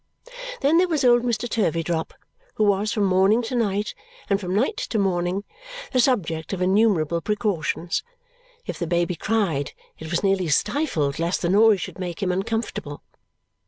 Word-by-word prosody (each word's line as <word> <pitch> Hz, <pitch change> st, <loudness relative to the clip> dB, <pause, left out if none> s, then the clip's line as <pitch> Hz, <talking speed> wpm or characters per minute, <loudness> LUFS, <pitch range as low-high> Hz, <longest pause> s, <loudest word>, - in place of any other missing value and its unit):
Then 305 Hz, +5 st, +4 dB
there 365 Hz, -, +3 dB
was 310 Hz, -6 st, 0 dB
old 240 Hz, -1 st, +6 dB
Mr. 240 Hz, -1 st, -1 dB
Turveydrop, 165 Hz, -7 st, -1 dB, 0.4 s
who -, -, +1 dB
was 205 Hz, +1 st, +2 dB
from 210 Hz, -, 0 dB
morning 195 Hz, +5 st, +3 dB
to 225 Hz, -, -5 dB
night 210 Hz, -3 st, 0 dB, 0.4 s
and 200 Hz, +1 st, +2 dB
from 180 Hz, 0 st, -2 dB
night 265 Hz, -, +1 dB
to 225 Hz, -, -2 dB
morning 185 Hz, -1 st, 0 dB, 0.5 s
the 255 Hz, -, +1 dB
subject 190 Hz, -, 0 dB
of 185 Hz, -, -3 dB
innumerable 185 Hz, -5 st, +2 dB
precautions. 200 Hz, -4 st, -1 dB, 0.6 s
If -, -, -5 dB
the 170 Hz, -, -2 dB
baby 175 Hz, +1 st, +1 dB
cried, 185 Hz, -10 st, -1 dB, 0.3 s
it 160 Hz, -, -7 dB
was 170 Hz, +3 st, -1 dB
nearly 195 Hz, -2 st, +2 dB
stifled 155 Hz, -, 0 dB
lest 170 Hz, +3 st, -1 dB
the 170 Hz, -, +1 dB
noise 210 Hz, 0 st, +5 dB
should -, -, -7 dB
make 180 Hz, +1 st, -4 dB
him 185 Hz, -, +1 dB
uncomfortable. 195 Hz, -6 st, -3 dB
195 Hz, 160 wpm, -23 LUFS, 170-225 Hz, 0.6 s, old